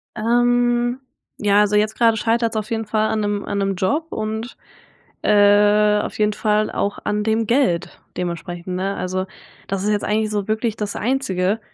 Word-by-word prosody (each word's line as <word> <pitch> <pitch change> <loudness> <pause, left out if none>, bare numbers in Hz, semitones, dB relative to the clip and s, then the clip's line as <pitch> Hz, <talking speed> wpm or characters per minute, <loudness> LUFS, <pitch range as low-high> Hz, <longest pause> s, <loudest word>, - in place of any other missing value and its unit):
Ähm, 240 +2 +2 0.4
ja, 205 -1 +3
also 210 0 +2
jetzt 215 +1 +2
grade 230 -2 +4
scheitert's 230 0 0
auf 215 +2 -4
jeden 225 -1 -1
Fall 215 +1 0
an 220 - 0
'nem 205 -1 -2
an 205 - -3
'nem 195 0 0
Job 290 - 0
und, 220 +2 -4 0.7
äh, 210 0 +4
auf - - -6
jeden 210 0 +2
Fall 215 0 0
auch 200 - -2
an 210 0 -1
dem 220 +1 0
Geld 205 -9 0 0.2
dementsprechend, 175 0 -4
ne? 195 +2 -2
Also, 185 +1 -2 0.4
das 195 -1 -2
ist 210 - 0
jetzt 205 -1 0
eigentlich 215 +1 0
so 205 -2 -2
wirklich 220 0 -1
das 205 -1 -4
Einzige. 210 -5 0
210 Hz, 175 wpm, -20 LUFS, 200-225 Hz, 0.7 s, grade